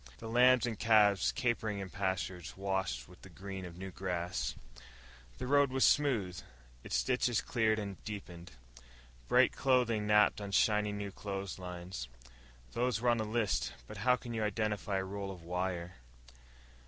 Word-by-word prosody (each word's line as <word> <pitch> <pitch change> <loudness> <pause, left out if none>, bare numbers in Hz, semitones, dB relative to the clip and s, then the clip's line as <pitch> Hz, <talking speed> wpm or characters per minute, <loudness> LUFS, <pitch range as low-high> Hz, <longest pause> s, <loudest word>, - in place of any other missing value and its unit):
The 115 - -8
lambs 125 +1 +5
and 115 -4 -4
calves 105 -3 +4
capering 115 -5 -1
in 95 -2 -6
pastures 95 -3 -3
washed 95 -11 -2
with - - -17
the - - -12
green 95 -1 -7
of 85 -1 -10
new 95 +1 -6
grass. 85 -9 -3 0.8
The 130 - -4
road 140 +1 +4
was 130 0 +3
smooth, 110 -12 +2 0.4
its - - 0
ditches 125 -2 +1
cleared 110 -2 +1
and 100 -3 -5
deepened. 90 -5 -8 0.7
Bright - - +5
clothing 120 -5 +2
napped 105 0 +4
on 100 -1 -6
shiny 105 0 +3
new 100 -1 -4
clotheslines 95 -5 -6 0.6
(those 120 - 0
were 120 +1 +2
on 120 - +3
the 110 - -1
list, 110 -1 0
but - - -9
how 125 0 +3
can 120 -1 -7
you 110 -1 -1
identify 105 -1 -1
a 95 - -1
roll 100 +1 -5
of 90 -3 -9
wire?). 90 -1 -3
100 Hz, 155 wpm, -33 LUFS, 95-115 Hz, 0.8 s, lambs